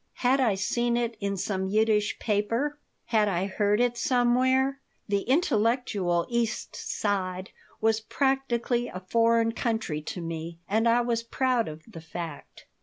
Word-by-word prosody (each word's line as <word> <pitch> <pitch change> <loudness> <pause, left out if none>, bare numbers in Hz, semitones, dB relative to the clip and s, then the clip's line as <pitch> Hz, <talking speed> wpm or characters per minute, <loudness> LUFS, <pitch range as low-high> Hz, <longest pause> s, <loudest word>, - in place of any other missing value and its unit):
Had 260 +2 +4
I 230 -7 +3
seen 235 +5 0
it 235 -1 -1
in 200 -1 -2
some 190 0 -2
Yiddish 210 0 +2
paper? 230 +8 -1 0.3
Had 215 -2 +2
I 185 -1 0
heard 205 +2 +1
it 240 -1 +1
somewhere? 260 +2 +2 0.3
The 200 -1 +1
intellectual 220 - +1
East 235 -2 -2
Side 185 -2 -2 0.3
was 220 0 +2
practically 245 -1 0
a 185 - -6
foreign 230 +1 +3
country 220 -10 -2
to 165 - -6
me, 165 0 -5
and 220 +3 +2
I 235 +1 +4
was 235 -1 0
proud 245 0 0
of 155 +1 -8
the 205 -8 -11
fact. 160 -1 -8
225 Hz, 145 wpm, -27 LUFS, 195-240 Hz, 0.3 s, Had